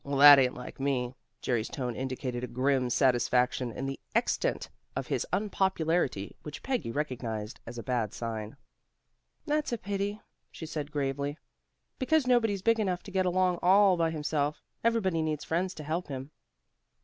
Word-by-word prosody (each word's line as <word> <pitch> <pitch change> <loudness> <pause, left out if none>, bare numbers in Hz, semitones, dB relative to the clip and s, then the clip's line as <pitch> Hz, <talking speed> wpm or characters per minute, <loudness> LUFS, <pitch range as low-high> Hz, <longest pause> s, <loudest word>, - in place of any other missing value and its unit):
"Well, 140 0 -2
that 145 0 +11
ain't 125 -1 +2
like 125 - -9
me." 130 -3 0 0.3
Jerry's 120 -3 0
tone 125 -3 -3
indicated 130 -1 -3
a - - -2
grim 130 +1 +1
satisfaction 125 -1 +2
in 130 +4 -5
the 135 0 -4 0.2
extent - - +1 0.3
of - - -2
his - - -1
unpopularity, 175 - 0
which 150 -1 -8
Peggy 255 - -1
recognized 115 -5 -3
as 120 +1 -7
a 115 - -5
bad 120 -5 -1
sign. 110 0 -5 0.9
"That's 300 -1 0
a 235 - 0
pity," 200 +1 -3 0.3
she 160 - -8
said 150 -2 -5
gravely. 140 0 -2 0.6
"Because 295 +2 +2
nobody's 225 -6 +2
big 230 +1 +3
enough 185 -4 -1
to 200 - -10
get 185 -1 +1
along 180 -1 +2
all 195 +1 +6
by 165 -1 +1
himself. 150 -1 -1 0.2
Everybody 205 -8 +2
needs 155 -2 -1
friends 180 +3 0
to 155 - -7
help 160 +3 -2
him." 135 0 -6
145 Hz, 160 wpm, -30 LUFS, 125-185 Hz, 0.9 s, that